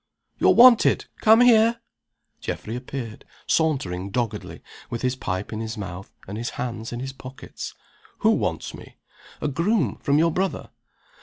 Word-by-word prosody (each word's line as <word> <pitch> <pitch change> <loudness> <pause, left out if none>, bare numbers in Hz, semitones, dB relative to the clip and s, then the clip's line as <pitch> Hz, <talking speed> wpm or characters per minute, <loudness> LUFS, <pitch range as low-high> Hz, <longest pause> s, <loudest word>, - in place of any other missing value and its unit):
"You're - - +5
wanted. 240 -1 +6
Come 220 +2 +6
here!" 230 -1 +5 0.6
Geoffrey 110 - -5
appeared, 125 -3 -6 0.2
sauntering 100 - 0
doggedly, 110 -1 -4 0.3
with 120 - -5
his 125 0 +1
pipe 95 -4 -4
in 110 - -4
his 110 0 -5
mouth, 95 -2 -7 0.2
and 100 +3 -5
his 120 - -3
hands 115 -2 -4
in 120 - -5
his 135 0 -5
pockets. 130 0 -9 0.5
"Who - - +5
wants - - -1
me?" - - -13 0.4
"A - - 0
groom 165 - 0
from 140 +1 +2
your 165 +2 +3
brother." 190 +4 -2
130 Hz, 150 wpm, -24 LUFS, 110-165 Hz, 0.6 s, wanted